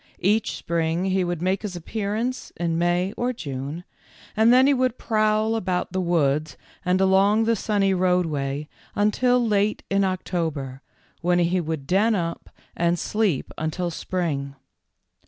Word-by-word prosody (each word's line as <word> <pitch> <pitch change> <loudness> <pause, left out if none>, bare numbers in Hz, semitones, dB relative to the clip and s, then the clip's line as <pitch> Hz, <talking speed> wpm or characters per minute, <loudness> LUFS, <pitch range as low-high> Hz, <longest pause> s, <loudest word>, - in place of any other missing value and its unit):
Each 210 +3 +2
spring 165 +1 -1
he 190 -1 +1
would 175 -1 -3
make 185 +1 +1
his 205 -4 -5
appearance 215 +7 -3
in 165 -1 -1
May 175 +3 +1
or 245 +1 0
June, 145 - -5 0.5
and 220 +2 +5
then 255 +1 +6
he 285 - +5
would 255 -2 0
prowl 215 0 +1
about 180 -5 -1
the 190 - 0
woods 155 -4 +1 0.3
and 180 0 +2
along 195 +3 +4
the 230 +1 +2
sunny 200 -2 +1
roadway 155 -6 0 0.3
until 245 +4 +2
late 210 0 +1
in 195 0 +3
October, 160 -8 -2 0.4
when 175 +1 +2
he 175 +1 +2
would 160 -4 -4
den 210 +8 +3
up 170 -3 -3 0.3
and 170 0 +1
sleep 205 -7 -1
until 165 +3 -2
spring. 150 -6 -3
185 Hz, 145 wpm, -24 LUFS, 165-210 Hz, 0.5 s, then